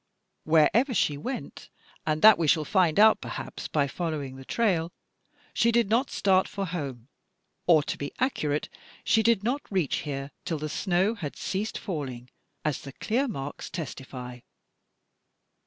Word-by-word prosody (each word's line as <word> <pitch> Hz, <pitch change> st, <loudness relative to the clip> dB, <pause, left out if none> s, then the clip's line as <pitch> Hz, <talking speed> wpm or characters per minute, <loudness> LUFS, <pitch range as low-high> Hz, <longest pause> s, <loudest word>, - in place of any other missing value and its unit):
Wherever 205 Hz, -, +4 dB
she 150 Hz, -, +2 dB
went, 245 Hz, -, -6 dB, 0.4 s
and 155 Hz, 0 st, 0 dB
that 220 Hz, -3 st, +9 dB
we 165 Hz, -, +1 dB
shall 155 Hz, 0 st, +3 dB
find 180 Hz, -2 st, +2 dB
out 220 Hz, +1 st, +6 dB
perhaps -, -, -6 dB
by 145 Hz, -2 st, +1 dB
following 145 Hz, -3 st, -4 dB
the 135 Hz, -, -10 dB
trail, 175 Hz, -, 0 dB, 0.6 s
she 235 Hz, -, +3 dB
did 230 Hz, -3 st, +2 dB
not 250 Hz, +4 st, +2 dB
start 190 Hz, -1 st, +2 dB
for 200 Hz, -1 st, -4 dB
home, 140 Hz, -9 st, -5 dB, 0.6 s
or 160 Hz, -4 st, +6 dB
to -, -, -4 dB
be 145 Hz, -, -4 dB
accurate, 155 Hz, -, 0 dB, 0.4 s
she 220 Hz, -, +3 dB
did 225 Hz, -3 st, +3 dB
not 260 Hz, +6 st, 0 dB
reach 185 Hz, -7 st, 0 dB
here, 140 Hz, -1 st, -4 dB
till 170 Hz, -3 st, -2 dB
the 155 Hz, +1 st, -4 dB
snow 185 Hz, +6 st, +1 dB
had 160 Hz, -11 st, -6 dB
ceased 205 Hz, +3 st, -3 dB
falling, 130 Hz, -, -5 dB, 0.3 s
as 150 Hz, -2 st, -1 dB
the 135 Hz, -, -9 dB
clear 250 Hz, -, 0 dB
marks 145 Hz, -, -5 dB
testify." 130 Hz, -6 st, -7 dB
165 Hz, 155 wpm, -27 LUFS, 145-215 Hz, 0.6 s, that